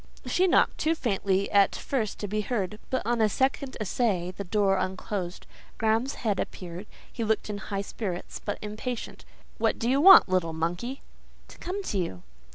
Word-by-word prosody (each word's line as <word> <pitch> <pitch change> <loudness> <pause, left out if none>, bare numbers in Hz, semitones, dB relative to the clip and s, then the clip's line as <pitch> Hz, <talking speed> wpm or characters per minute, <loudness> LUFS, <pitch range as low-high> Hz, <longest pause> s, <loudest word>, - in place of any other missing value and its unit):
She 370 +1 +2
knocked—too 325 -2 +3
faintly 200 -7 0
at 200 -1 +4
first 230 -7 -2
to 205 - -2
be 210 +2 -1
heard, 210 -2 -2
but 260 - -1
on 235 0 +1
a 215 - +4
second 265 +3 0
essay 195 -4 0
the 200 - -5
door 195 0 +2
unclosed; 185 -1 -4 0.3
Graham's 225 +5 +1
head 205 -3 +1
appeared; 180 +2 -6 0.3
he 235 - -3
looked 220 -1 0
in 205 - -5
high 200 -1 -3
spirits, 190 -4 -5
but 205 - -3
impatient. 220 +3 -5 0.3
"What - - +2
do 230 - -2
you 270 +3 +3
want, 385 +4 +10
you 185 - -4
little 165 -3 +1
monkey?" 175 +11 -3 0.5
"To - - -13
come 385 +3 -4
to 205 - -1
you." 95 - -4
210 Hz, 175 wpm, -27 LUFS, 190-240 Hz, 0.5 s, want